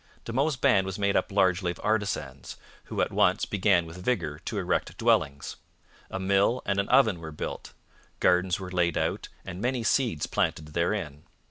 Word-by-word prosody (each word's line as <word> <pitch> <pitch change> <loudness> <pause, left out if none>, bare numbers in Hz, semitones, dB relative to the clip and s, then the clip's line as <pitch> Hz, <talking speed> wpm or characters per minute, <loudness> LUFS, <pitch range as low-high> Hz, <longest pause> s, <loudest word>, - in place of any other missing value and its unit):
De 115 - -5
Monts' 140 +4 +1
band 125 -7 +3
was 95 - -4
made 100 -1 +1
up - - +1
largely 95 -2 +2
of 85 - -5
artisans, 100 - -2 0.3
who - - -2
at - - 0
once - - +3
began 95 -3 +2
with 85 +3 -10
vigour 85 -11 -1
to - - -5
erect - - -1
dwellings. 70 0 +1 0.5
A 95 - -4
mill 100 +6 +2
and 100 0 0
an 100 - -1
oven 105 -6 +4
were 80 -1 -7
built; 75 - -6 0.5
gardens 90 +2 +2
were 95 -1 -7
laid 85 -3 +1
out - - -1 0.2
and 95 0 -7
many 125 0 -1
seeds 115 - +1
planted 75 0 -1
therein. 85 -2 -2
95 Hz, 175 wpm, -27 LUFS, 85-105 Hz, 0.5 s, oven